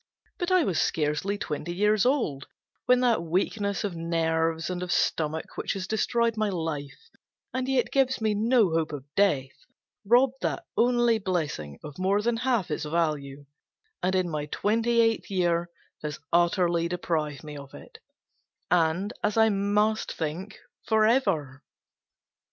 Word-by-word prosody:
But 350 -1 -1
I 370 -2 +5
was 185 - +1
scarcely 155 +6 0
twenty 175 -1 -4
years 210 +3 +3
old, 190 - 0 0.4
when 250 0 +5
that 240 -7 +3
weakness 195 +4 -1
of 200 -4 -3
nerves 165 -1 0
and 180 -1 -3
of 180 -1 -3
stomach, 160 0 -1
which - - -2
has 195 -1 -4
destroyed 230 +2 +1
my 215 -1 0
life, 160 - -5 0.4
and 255 0 -2
yet 260 -2 +1
gives 265 -2 +2
me 220 -1 +1
no 220 -2 +3
hope 160 -1 0
of 140 -2 -6
death, 145 -10 +2 0.5
robbed 250 +5 +3
that - - -2
only 240 -1 +3
blessing 155 - -3
of 150 +3 -9
more 195 +2 +2
than 235 0 +1
half 235 -8 0
its 150 - -2
value, 150 -3 -2 0.6
and, 185 +1 +1
in 185 -1 +1
my 150 -3 -3
twenty 230 +7 +1
eighth 225 -1 +1
year, 175 -2 +1 0.3
has 150 -1 -5
utterly 170 -1 +2
deprived 160 -5 -2
me 150 -1 -8
of 140 -1 -10
it, 70 - -13 0.7
and, 175 +5 +2
as 210 - 0
I 220 0 +6
must 210 +2 +1
think, 170 +6 -5 0.3
forever. 215 - +2
185 Hz, 150 wpm, -27 LUFS, 160-220 Hz, 0.7 s, I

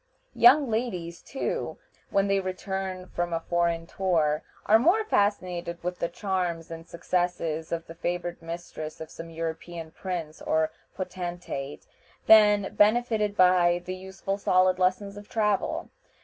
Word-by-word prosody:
Young 270 +4 +6
ladies, 185 -8 -2
too, 270 - -3 0.3
when 195 0 +2
they 195 0 +2
return 190 0 -4
from 175 -1 -3
a 165 - +1
foreign 170 0 0
tour, 165 -5 +1 0.2
are 220 +1 +6
more 360 - +4
fascinated 180 - 0
with 180 0 -3
the 170 - -1
charms 175 -4 -2
and 165 0 -8
successes 170 -2 -1
of 165 -1 -2
the 165 - -10
favored 175 +1 -3
mistress 165 -2 -7
of 160 0 -8
some 165 0 -8
European 165 0 -5
prince 170 -4 -5
or 160 0 +1 0.2
potentate 175 -6 -5 0.4
than 210 -2 +6
benefited 215 -1 +3
by 180 -1 +5
the 185 - -3
useful 190 +1 -5
solid 185 -1 +3
lessons 200 +2 0
of 205 0 -11
travel. 210 -3 0
180 Hz, 135 wpm, -27 LUFS, 170-200 Hz, 0.4 s, Young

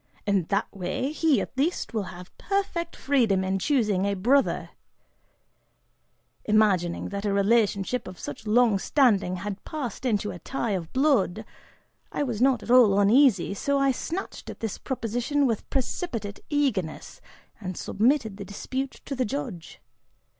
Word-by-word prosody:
In 200 -4 +1
that 200 +1 +1
way, 195 +9 -2
he, 310 -2 +2
at - - -7
least, 285 -1 -1
will 215 -3 -1
have 180 0 -11
perfect 370 -4 -2
freedom 230 -9 +2
in 190 +1 -1
choosing 210 -6 +1
a 200 0 0
'brother'." 255 +9 +2 1.7
Imagining 200 -5 +2
that 200 0 -4
a 205 - 0
relationship 205 +2 +1
of 185 -1 -9
such 150 +10 -7
long 220 -2 +4
standing 205 -8 +2
had 200 +2 -5
passed 270 -9 -5
into 210 -5 0
a 175 - -8
tie 235 +4 -3
of 175 -5 -3
blood, 255 -7 +2 0.7
I - - -1
was 240 -5 -3
not 260 -4 +3
at - - -3
all 225 -6 +6
uneasy, 210 -2 +4
so 280 +8 0
I 275 0 +3
snatched 340 +8 -5
at - - -8
this 225 -3 -4
proposition 245 +3 -1
with 230 -5 -1
precipitate 235 - -3
eagerness, 250 - -1 0.4
and 185 -4 -5
submitted 220 -1 +1
the 200 - -6
dispute 260 +7 -5
to 275 - -4
the 255 - 0
judge. 165 0 -5
220 Hz, 150 wpm, -26 LUFS, 195-270 Hz, 1.7 s, all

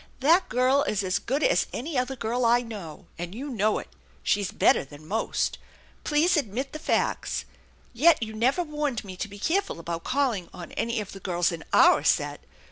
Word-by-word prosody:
That 330 +7 +4
girl 255 +3 +3
is 205 -7 0
as 185 0 0
good 275 +5 -1
as - - +3
any 300 +4 -4
other 255 +1 0
girl 245 +1 -1
I 240 +1 +4
know, 200 -10 -8
and 175 +3 -5
you 275 +5 -5
know 215 -2 +1
it. - - -6 0.4
She's 205 -2 +1
better - - +3
than 145 +2 -14
most. 220 +5 -1 0.4
Please 310 +5 +3
admit 265 - -2
the 310 - -5
facts. 320 - -1 0.5
Yet 295 +2 +4
you 220 0 -5
never 255 +10 +1
warned 295 -6 -2
me 190 -2 -8
to 215 - -3
be 205 0 -11
careful 365 - 0
about 170 0 -5
calling 255 -10 0
on 175 - -9
any 235 -1 -1
of 205 - -8
the 195 - -9
girls 175 -2 0
in 165 -2 -6
our - - +6
set. - - +1
235 Hz, 195 wpm, -26 LUFS, 195-280 Hz, 0.5 s, our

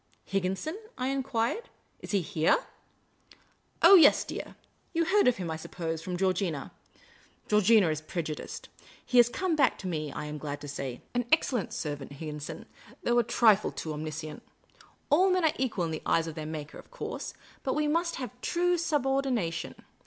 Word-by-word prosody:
" - - -36
Higginson? 195 - -2
" - - -33
I 255 - -1
enquired. 270 - -1 0.2
" - - -40
Is - - -10
he 200 -3 +1
here? 160 -3 +3 0.4
" - - -28
" - - -39
Oh, - - +10
dear, 360 - +9 0.3
yes. - - -6 0.4
You 335 0 +3
heard 405 +1 +4
of 250 - +4
him, 175 -3 -3
I 160 - -3
suppose, 165 0 -4
from 180 +1 -4
Georgina. 185 -6 -1 0.8
Georgina 210 -1 +5
is 155 0 -2
prejudiced. 155 -1 -5 0.4
He 250 - +1
has 240 -1 +7
come 365 +5 0
back 275 -5 +3
to 190 - -6
I - - -2
WAITED, 155 -2 -2
BREATHLESS. 140 - -9
me, - - -3
I - - -4
am 150 0 -5
glad 145 -1 -5
to 145 - -7
say. 135 -3 -5
An 245 -1 0
excellent 255 - +2
servant, 145 -2 -4
Higginson, 150 0 -6 0.4
though 240 0 +3
a - - +4
trifle 215 -2 +4
too 155 - -5
omniscient. 155 0 -5 0.7
All 365 +6 +5
men 365 -2 +2
are 310 - +3
equal 225 -9 0
in 165 - -3
the 155 - -4
eyes 165 - +2
of 165 - -5
their 155 0 -6
Maker, 155 -1 -6
of - - -15
course; - - -6 0.3
but 265 - -1
we 300 0 +1
must 335 +3 +1
have 255 -2 -5
due 355 0 +1
subordina 270 - +1
tion. - - -5
195 Hz, 200 wpm, -29 LUFS, -, 0.8 s, Oh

